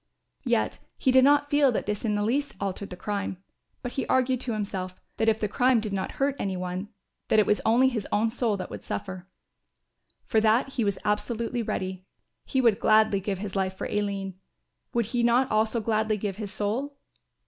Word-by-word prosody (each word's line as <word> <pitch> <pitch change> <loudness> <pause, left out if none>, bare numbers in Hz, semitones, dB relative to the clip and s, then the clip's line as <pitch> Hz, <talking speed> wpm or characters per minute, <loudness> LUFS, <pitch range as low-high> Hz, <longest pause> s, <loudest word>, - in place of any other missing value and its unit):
Yet - - +1 0.2
he 260 - +2
did 260 0 +6
not 290 +1 +4
feel 290 -2 +5
that - - -1
this 210 0 -3
in 215 -2 +1
the 205 - 0
least 275 +6 0
altered 195 0 -3
the 180 - -8
crime; 200 -1 -3 0.5
but 245 - -3
he 270 - -3
argued 260 -1 +2
to 245 -3 -2
himself, 190 -3 -4 0.2
that 225 0 +3
if 220 0 +1
the 210 - 0
crime 245 +3 +3
did 215 -2 -4
not 190 -1 -2
hurt 275 0 0
any 190 -2 -2
one 180 +2 -4 0.4
that - - +3
it 215 - +5
was 210 - +2
only 240 +4 +5
his 225 -6 -2
own 220 +2 +2
soul 230 -3 0
that 185 - -6
would - - -7
suffer. 185 -2 -5 1.0
For 220 - +2
that 225 +5 +3
he 255 -3 -1
was 200 -2 0
absolutely 230 +3 -1
ready. 185 -4 -3 0.4
He 265 - +1
would 230 -5 +3
gladly 215 -2 +4
give 195 0 -3
his 195 0 -6
life 190 -1 0
for - - -4
Aline, 195 -2 -2 0.5
would 235 -2 +1
he 240 +3 -1
not 240 +2 +3
also 220 +2 +2
gladly 215 0 0
give 200 -2 -3
his 210 -3 -5
soul? 240 +8 -2
215 Hz, 205 wpm, -27 LUFS, 200-245 Hz, 1.0 s, did